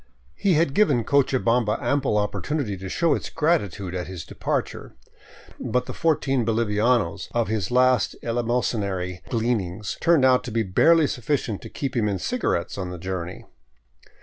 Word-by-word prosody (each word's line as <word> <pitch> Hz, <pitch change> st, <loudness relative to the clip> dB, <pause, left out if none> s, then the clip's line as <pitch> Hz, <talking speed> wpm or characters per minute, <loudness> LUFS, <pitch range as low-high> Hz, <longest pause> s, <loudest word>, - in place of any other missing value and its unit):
He 180 Hz, -, +1 dB
had 155 Hz, -3 st, +2 dB
given 175 Hz, -, +3 dB
Cochabamba 125 Hz, -4 st, +2 dB
ample 140 Hz, -6 st, +1 dB
opportunity 105 Hz, +3 st, -2 dB
to 95 Hz, 0 st, -7 dB
show 165 Hz, -, +2 dB
its -, -, -3 dB
gratitude 105 Hz, -, 0 dB
at 90 Hz, -1 st, -4 dB
his 90 Hz, -3 st, -7 dB
departure, -, -, -4 dB, 0.6 s
but 125 Hz, 0 st, -1 dB
the -, -, -6 dB
fourteen 135 Hz, -5 st, +1 dB
bolivianos 115 Hz, -2 st, +1 dB
of 115 Hz, -2 st, 0 dB
his 105 Hz, -4 st, -1 dB
last 125 Hz, -2 st, +3 dB
eleemosynary 105 Hz, -6 st, -1 dB
glean 115 Hz, -1 st, +1 dB
ings 95 Hz, +4 st, -6 dB
turned 165 Hz, -5 st, +4 dB
out 130 Hz, -1 st, +4 dB
to 125 Hz, -, -5 dB
be 115 Hz, 0 st, +1 dB
barely 160 Hz, -, +4 dB
sufficient 120 Hz, -5 st, -2 dB
to -, -, -9 dB
keep 135 Hz, -2 st, -4 dB
him 110 Hz, -3 st, +1 dB
in 100 Hz, -2 st, -1 dB
cigarettes 100 Hz, -, -2 dB
on 90 Hz, -1 st, -3 dB
the 90 Hz, -, -6 dB
journey. 90 Hz, 0 st, -5 dB
115 Hz, 155 wpm, -24 LUFS, 100-135 Hz, 0.6 s, turned